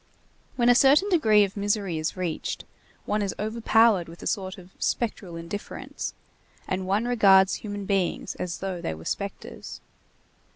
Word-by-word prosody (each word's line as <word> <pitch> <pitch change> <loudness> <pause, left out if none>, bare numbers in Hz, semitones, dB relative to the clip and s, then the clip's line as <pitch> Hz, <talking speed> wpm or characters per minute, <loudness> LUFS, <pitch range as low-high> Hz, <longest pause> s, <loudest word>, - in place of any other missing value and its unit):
When 240 -2 +2
a 245 - +8
certain 280 +10 +5
degree 220 - +5
of 195 -1 -3
misery 200 -4 -1
is 155 +3 -3
reached, 175 -4 -3 0.4
one 210 0 0
is 200 -2 -2
overpowered 220 -4 +3
with 170 - -11
a - - -7
sort 190 -1 -2
of 185 0 -14
spectral 205 -7 -2
indifference, 170 +5 -6 0.5
and 185 0 -2
one 205 +4 +1
regards 195 -6 +5
human 205 -2 -5
beings 195 -3 -1
as 175 -2 -3
though 190 -2 -3
they 80 - -3
were 80 +1 -12
spectres. 200 0 -5
200 Hz, 155 wpm, -26 LUFS, 185-220 Hz, 0.5 s, a